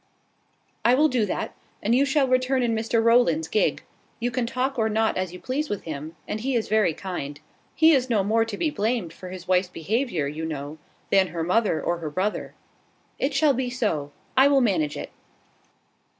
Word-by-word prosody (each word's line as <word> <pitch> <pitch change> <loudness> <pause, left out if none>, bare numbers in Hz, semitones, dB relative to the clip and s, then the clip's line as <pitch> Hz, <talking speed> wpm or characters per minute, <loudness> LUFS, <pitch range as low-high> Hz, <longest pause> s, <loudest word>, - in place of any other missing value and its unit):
"I 240 +2 +5
will 305 +3 +4
do 240 -6 +1
that; - - -3 0.3
and 220 - +2
you 265 +3 +4
shall 280 -1 +2
return 255 0 +2
in 235 -1 +1
Mr 225 +1 +1
Rowland's 230 -10 +3
gig. 215 - +1 0.4
You 240 +1 -1
can 235 0 -1
talk 255 +1 -1
or 220 0 +2
not 220 +1 +1
as 185 -2 -2
you 180 - -9
please 280 +7 -2
with 205 - -3
him; 155 +1 -6
and 215 - -3
he 260 +3 -1
is 230 - 0
very 210 -7 +2
kind. 145 -7 -5 0.4
He 320 +1 +6
is 260 -4 +2
no 215 -4 +2
more 225 +3 +2
to 225 -3 -5
be 315 - 0
blamed 215 - -1
for 185 - -10
his 185 -1 -9
wife's 180 0 +2
behaviour, 185 - -1
you 150 +3 -4
know, 150 -1 -5 0.3
than 190 -1 +5
her 165 0 -4
mother 185 0 +2
or 175 0 -1
her 160 -2 -4
brother. 190 +7 -2 0.6
It 275 +1 -1
shall 290 0 +4
be 255 0 -1
so. 205 - -2 0.2
I 265 +1 +7
will 280 -1 +4
manage 165 - +1
it." - - -6
220 Hz, 200 wpm, -25 LUFS, 175-255 Hz, 0.6 s, I